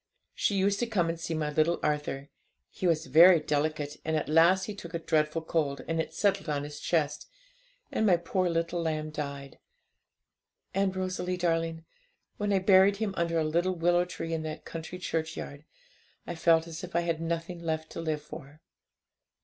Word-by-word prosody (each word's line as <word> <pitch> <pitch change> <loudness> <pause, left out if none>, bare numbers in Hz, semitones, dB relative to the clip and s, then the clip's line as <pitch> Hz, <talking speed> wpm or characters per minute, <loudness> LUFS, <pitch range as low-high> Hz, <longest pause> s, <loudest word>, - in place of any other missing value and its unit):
She 205 - 0
used 200 +1 +2
to 240 - 0
come 185 -7 +1
and 165 0 -3
see 165 0 -3
my 150 -1 -1
little 155 +3 +2
Arthur; 150 -2 -2 0.4
he 185 - -2
was 165 -2 +1
very 165 +6 +7
delicate, 150 0 -1
and 160 0 -1
at 155 - -2
last 170 +5 +5
he 210 - -4
took 170 -4 -8
a - - +2
dreadful 155 0 0
cold, 145 -4 -1
and 165 0 0
it - - -6
settled 200 -5 0
on 145 -1 -1
his 145 0 -7
chest, 160 -4 -1 0.6
and - - 0
my 190 -5 +5
poor 180 +2 0
little 170 +1 -1
lamb 155 -1 -2
died. 140 -2 -6 1.1
And, 195 0 +1
Rosalie 185 -1 -2
darling, 165 -2 -1 0.5
when 205 -1 -1
I 195 - +4
buried 190 +1 +5
him 210 -2 -2
under 170 0 0
a 160 - +2
little 170 +4 +1
willow 175 +1 +2
tree 165 -2 -5
in 160 - -1
that 155 0 -6
country 165 +2 -7
churchyard, 160 -4 -4 0.6
I - - -4
felt 165 -1 +3
as 165 0 -8
if 180 -1 -8
I 170 - +3
had 165 -1 -2
nothing 170 +1 -3
left 160 -1 -3
to - - -5
live 155 -2 -2
for. 150 -1 -11
165 Hz, 185 wpm, -29 LUFS, 155-180 Hz, 1.1 s, very